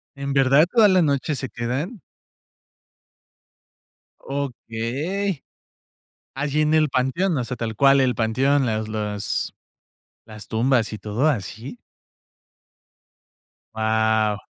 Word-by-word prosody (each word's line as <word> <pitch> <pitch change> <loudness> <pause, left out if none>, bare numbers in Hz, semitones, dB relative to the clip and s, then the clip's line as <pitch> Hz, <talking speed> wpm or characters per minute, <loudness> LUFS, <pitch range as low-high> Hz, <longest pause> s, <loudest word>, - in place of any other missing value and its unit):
¿En 140 0 -4
verdad 140 +4 +4
toda 225 -3 +6
la 185 -1 +4
noche 145 -1 0
se 130 0 -5
quedan? 135 - -4 2.2
Okey, 140 - -3 0.9
allí, 145 +2 -1
en 155 +1 +2
el 155 -1 +4
panteón, 140 +8 0
o 125 - -1
sea, 125 +1 -5
tal 110 -1 -4
cual 140 +2 +5
el 130 -2 +2
panteón, 130 +5 +1
las 110 -1 -2
las 105 -2 -3 0.7
las 105 -2 -11
tumbas 115 0 +1
y 110 - -5
todo 105 +8 -1
¿así? 115 - -4 2.0
Wao. 110 -1 +1
130 Hz, 110 wpm, -22 LUFS, 110-145 Hz, 2.2 s, toda